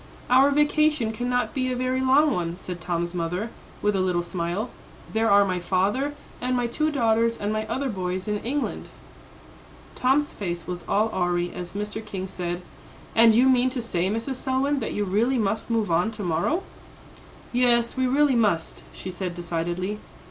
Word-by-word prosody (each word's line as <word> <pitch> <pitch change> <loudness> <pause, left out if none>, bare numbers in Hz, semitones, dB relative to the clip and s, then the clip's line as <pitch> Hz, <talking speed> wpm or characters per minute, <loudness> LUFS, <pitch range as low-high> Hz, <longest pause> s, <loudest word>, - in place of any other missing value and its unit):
"Our 265 +2 +7
vacation 295 -4 +2
cannot 245 +2 -1
be 255 -1 0
a - - -1
very 255 +1 0
long 275 +3 +4
one," 170 -1 -2
said 180 -2 -7
Tom's 170 +1 -2
mother, 180 +6 -2 0.3
with 210 -1 +2
a - - +1
little 180 -2 +1
smile; 175 +6 -3 0.4
"there 225 +1 +2
are 200 0 +6
my 185 -2 -1
father 200 +11 0 0.3
and 250 0 0
my 245 - +1
two 305 +6 0
daughters 230 -4 +2
and 205 +1 -2
my 215 0 -2
other 265 +5 -1
boys 185 -3 -3
in 210 0 0
England." 275 +6 -3 1.1
Tom's 275 +3 +1
face 175 -4 -4
was 175 -1 -5
all 215 +2 +2
awry 175 -1 0
as 175 -1 -6
Mr. 210 +2 -4
King 195 -3 -5
said, 175 -1 -4 0.5
"And 225 -1 +6
you 250 +3 +5
mean 255 -1 +4
to 255 0 -4
say, 185 -6 -1
Mrs. 230 +5 -2
Selwyn, 270 +2 0
that 225 - -3
you 210 - 0
really 220 +7 +1
must 215 0 -1
move 225 -5 0
on 175 +6 +3
to 210 - -6
morrow?" 175 - 0 0.9
"Yes; 240 -1 +3
we 260 -1 +1
really 280 +1 +3
must," 205 -8 +1
she 185 - -6
said 180 -1 -4
decidedly. 175 +4 -3
215 Hz, 175 wpm, -25 LUFS, 180-255 Hz, 1.1 s, Our